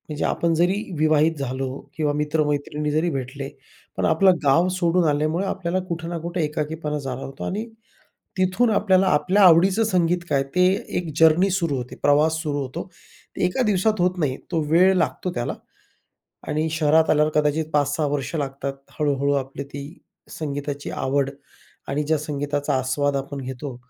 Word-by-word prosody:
म्हणजे 150 -1 -3
आपण 170 -1 +1
जरी 175 +4 +2 0.2
विवाहित 155 +1 +3
झालो 130 0 -3 0.3
किंवा 150 -2 +1
मित्र-मैत्रिणी 150 0 -1
जरी 155 +3 +1
भेटले 135 -1 -5 0.5
पण - - 0
आपलं 185 +3 +4
गाव 150 +6 +4
सोडून 175 0 +2
आल्यामुळे 155 +5 0
आपल्याला 185 -1 -1
कुठे 165 -1 -4
ना 170 0 -3
कुठे 170 +1 -2
एकाकीपणा 150 0 -3
जाणवतो 135 0 -6
आणि 210 +4 -3 0.7
तिथून 185 +6 +2
आपल्याला 190 -2 +3
आपल्या 185 +5 +2
आवडीचं 185 +5 +6
संगीत 180 -5 +2
काय, 135 -1 +2
ते 160 +7 0 0.3
एक 175 -3 -3
जर्नी 165 +4 +5
सुरू 170 -6 0
होते, 125 -1 -6
प्रवास 150 +2 +4
सुरू 145 -2 -2
होतो. 135 +6 -5 0.5
एका 180 +8 0
दिवसात 210 0 +1
होत 180 +1 +1
नाही, 140 -5 0
तो 165 -3 +1
वेळ 180 +4 +5
लागतो 180 +1 -1
त्याला 120 0 -3 0.9
आणि 155 +1 0
शहरात 160 0 +3
आल्यावर 150 0 +3
कदाचित 150 +1 +1
5-6 145 +1 +1
वर्ष 140 +2 -3
लागतात, 140 -1 -3 0.3
हळू-हळू 140 -2 +1
आपली 140 +1 -8
ती 140 0 -8 0.6
संगीताची 145 -1 -4
आवड 135 +1 0 0.6
आणि 145 +2 -1
ज्या 155 +1 +1
संगीताचा 145 -1 -2
आस्वाद 140 +2 0
आपण 140 +1 -4
घेतो, 130 0 -6
150 Hz, 155 wpm, -23 LUFS, 140-175 Hz, 0.9 s, आवडीचं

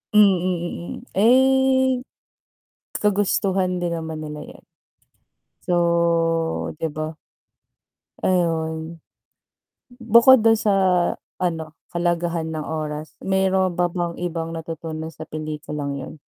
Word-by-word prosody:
Mm, 205 -3 +7
mm. 175 -1 -3 0.3
Eh, 260 +2 +4 1.0
kagustuhan 195 -2 +1
din 175 -1 -2
naman 160 -1 -4
nila 150 0 -7
'yan. - - -13 1.0
So 170 -1 +1
di 160 - 0
ba? 155 +1 -5 1.1
Ayun. 165 -2 0 1.0
Bukod 235 +1 +6
dun 225 - +7
sa 215 -2 +1 0.7
ano, 160 -3 -2 0.2
kahalagahan 170 -1 -1
ng 155 - -3
oras, 155 0 -5
meron 190 -1 +2
ba 175 0 +1
bang 175 -1 -2
ibang 165 -2 -3
natutunan 160 -1 -6
sa 160 0 -10
pelikulang 150 -2 -5
yun? 135 - -7
170 Hz, 100 wpm, -22 LUFS, 160-190 Hz, 1.1 s, Mm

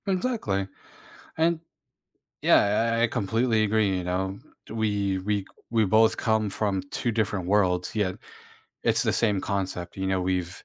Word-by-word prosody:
Exactly, 185 - -1 0.7
and 165 +1 +2 0.8
yeah, 115 +3 +3
I - - +2
I - - +5
completely 110 +1 +1
agree, 105 -3 +1
you 90 - -4
know, 95 +2 -2 0.3
t - - -10
we've 100 -4 -1
we 105 0 +1
c - - -19 0.2
we 115 -2 +3
both 110 +3 +4
come 110 -1 +1
from 100 -1 -1
two 120 - -1
different 105 -4 -1
worlds, 90 -2 +1
yet, 100 -4 0 0.7
it's - - +3
the - - +1
same 105 -4 +2
concept, 95 -3 -3
you 95 - -1
know, 95 -1 +1
we've 90 0 -2
100 Hz, 160 wpm, -26 LUFS, 95-110 Hz, 0.8 s, I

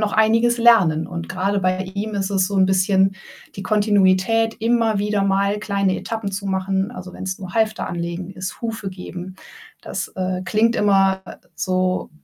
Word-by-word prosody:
noch 210 -1 0
einiges 230 +2 +3
lernen. 190 -10 +4
Und 170 -1 -6
grade 195 +2 -1
bei 185 0 +1 0.2
ihm 210 +1 -3
ist 195 0 -1
es 190 -2 +2
so 200 - -3
'n 190 0 +5
bisschen 190 0 +2 0.4
die 195 - -5
Kontinuität, 205 +2 +2
immer 230 -2 +2
wieder 205 0 0
mal 200 +1 +1
kleine 200 -2 0
Etappen 220 -3 -4
zu 200 +1 -4
machen, 190 +2 -1
also, 185 -4 -9
wenn's 190 0 -5
nur 185 -1 -8
Halfter 220 -1 0
anlegen 170 +1 -4
ist, 185 0 -6
Hufe 220 -4 -4
geben. 185 0 -8 0.5
Das, - - -4
äh, 185 0 -2
klingt 225 +5 +2
immer 195 -2 +3 0.3
so 185 0 -1
195 Hz, 165 wpm, -21 LUFS, 185-215 Hz, 0.5 s, n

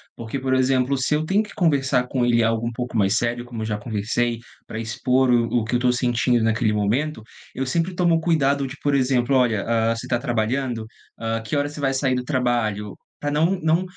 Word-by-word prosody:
porque, 115 +3 -5
por 130 0 -1
exemplo, 130 +1 +2
se 135 +3 0
eu 155 +1 -1
tenho 195 +5 +2
que 210 - -9
conversar 135 -7 +2
com 125 -1 -1
ele 120 -1 +3
algo 115 +1 0
um - - -2
pouco 120 +1 -5
mais 100 -1 +2
sério 120 +1 -1
como 120 -2 -6
eu - - -2
já 105 -1 -2
conversei, 115 +2 -1 0.3
pra 110 - -5
expor 125 +3 +1
o 120 -1 +3
o - - -3
que 110 - -5
eu - - +4
estou 125 0 +2
sentindo 120 -1 +1
naquele 110 0 +1
momento, 110 +6 -1 0.3
eu 135 - -2
sempre 170 +7 -1
tomo 170 -2 +3
cuidado 140 -4 +1
de 130 - -8
por 145 - +1
exemplo, 130 -1 +2
olha 120 -6 +2
hã, 115 0 +1
você 115 - -6
tá 120 - 0
trabalhando? 120 -1 -1 0.3
Hã, 115 0 -2
que 115 +7 -4
horas 145 0 0
você 150 - -8
vai 135 -2 0
sair 130 -1 +1
do 125 0 -1
trabalho? 120 -6 -1 0.2
Pra 145 - -2
não 165 +6 +1
não 160 +2 +2
125 Hz, 225 wpm, -22 LUFS, 115-140 Hz, 0.3 s, eu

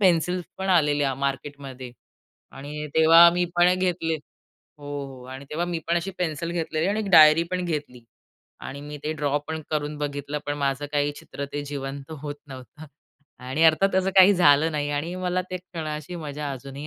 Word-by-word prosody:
pencils 180 -1 +2
पण 190 0 -3
आलेल्या 145 -5 +2
मार्केटमध्ये 135 -2 -5 0.6
आणि 150 +2 -7
तेव्हा 165 +2 +8
मी 180 - +1
पण 175 +1 +5
घेतले 175 -3 0 0.4
हो, 145 -2 -18 0.2
हो 130 -2 -11
आणि 135 +1 -8
तेव्हा 170 +3 -2
मी 175 -2 -3
पण 170 - +2
अशी 180 +3 -4
पेन्सिल 170 -1 -2
घेतलेली 160 -1 -1
आणि 205 +2 0
एक 205 -2 -3
डायरी 155 0 +8
पण 180 -1 -1
घेतली 145 -7 -4 0.6
आणि 140 +1 -7
मी 150 +1 -8
ते 155 - -1
ड्रॉ 145 -2 0
पण 160 0 -3
करून 150 -1 -2
बघितलं, 145 0 -3
पण 145 - -1
माझं 140 0 -1
काही 145 0 +1
चित्र 140 - -7
ते 145 0 -3
जिवंत 140 0 -6
होत 145 -1 -4
नव्हतं 135 +3 -11 0.6
आणि 135 +5 -1
अर्थात 165 +5 +4
असं 190 0 +2
काही 190 +2 +8
झालं 155 -2 +4
नाही 145 -1 -1
आणि 150 +5 -2
मला 185 0 -1
ते 185 - -2
क्षणाशी 160 -2 -6
मजा 150 -2 -5
अजूनही 135 +2 -8
150 Hz, 180 wpm, -25 LUFS, 145-170 Hz, 0.6 s, तेव्हा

